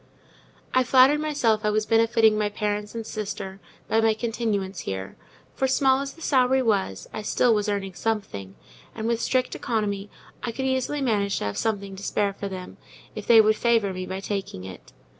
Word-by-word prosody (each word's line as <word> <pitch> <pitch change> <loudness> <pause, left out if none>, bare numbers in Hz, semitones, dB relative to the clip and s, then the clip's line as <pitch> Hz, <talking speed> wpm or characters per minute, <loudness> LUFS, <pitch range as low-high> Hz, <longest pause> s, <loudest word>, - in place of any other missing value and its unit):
I 255 - +4
flattered 260 +3 +5
myself 250 -8 +1
I 210 - +2
was 215 0 +1
benefiting 225 -1 +4
my 210 -1 0
parents 210 +1 -3
and 225 -1 -4
sister 200 -3 -5 0.3
by 225 - +2
my 225 -1 +3
continuance 215 -5 -2
here; 95 -5 -5 0.4
for 265 - 0
small 265 0 +3
as 275 0 -5
the 330 - -12
salary 260 -1 +3
was, 195 - 0
I 215 - -4
still 230 +3 +2
was 210 -1 0
earning 195 -2 -2
something, 175 - -3 0.4
and 220 - -4
with 235 -1 0
strict 255 -1 0
economy 210 -4 -2 0.3
I 240 - -3
could 265 +3 -3
easily 265 +2 0
manage 205 -6 +1
to - - -3
have 100 0 -3
something 200 -3 -2
to 190 - -10
spare 200 0 0
for 200 0 -5
them, 185 -1 -8 0.4
if - - -7
they 225 -2 +8
would 215 0 +3
favour 225 -4 +2
me 185 0 -5
by 190 +1 -4
taking 195 - -4
it. 95 -1 -10
215 Hz, 190 wpm, -25 LUFS, 200-235 Hz, 0.4 s, they